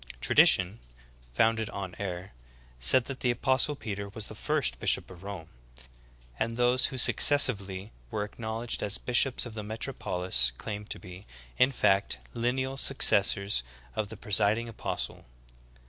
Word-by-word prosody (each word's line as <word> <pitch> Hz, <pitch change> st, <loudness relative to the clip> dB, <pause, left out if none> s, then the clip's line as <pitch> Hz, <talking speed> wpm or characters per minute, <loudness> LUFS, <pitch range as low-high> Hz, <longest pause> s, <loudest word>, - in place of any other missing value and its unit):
Tradition, 95 Hz, -, +4 dB, 0.6 s
founded 110 Hz, -, +1 dB
on 95 Hz, -2 st, -7 dB
error, 95 Hz, -1 st, -5 dB, 0.5 s
said 120 Hz, -, +4 dB
that 135 Hz, -1 st, -7 dB
the 125 Hz, -, 0 dB
apostle 130 Hz, +4 st, +1 dB
Peter 100 Hz, -5 st, -6 dB
was 105 Hz, +1 st, -6 dB
the -, -, -8 dB
first -, -, -1 dB
bishop -, -, 0 dB
of 90 Hz, -2 st, -13 dB
Rome; 95 Hz, -5 st, -8 dB, 0.9 s
and 115 Hz, +1 st, -2 dB
those 125 Hz, +1 st, +3 dB
who 130 Hz, -, -7 dB
successively 105 Hz, -8 st, +4 dB, 0.2 s
were 105 Hz, -, -3 dB
acknowledged 110 Hz, +2 st, -5 dB
as 105 Hz, 0 st, +1 dB
bishops 125 Hz, +2 st, +1 dB
of 120 Hz, -, -8 dB
the 110 Hz, -, -6 dB
metropolis 90 Hz, -, -1 dB
claimed 105 Hz, -1 st, -7 dB
to -, -, -3 dB
be, 90 Hz, +2 st, -12 dB, 0.3 s
in 125 Hz, -, +5 dB
fact, 100 Hz, -, +1 dB, 0.2 s
lineal 130 Hz, +3 st, -2 dB
successors 100 Hz, -, +3 dB, 0.3 s
of 110 Hz, -2 st, -2 dB
the 110 Hz, -, -8 dB
presiding 105 Hz, +2 st, +1 dB
apos 110 Hz, -, -4 dB
tle. -, -, -14 dB
110 Hz, 145 wpm, -28 LUFS, 95-120 Hz, 0.9 s, in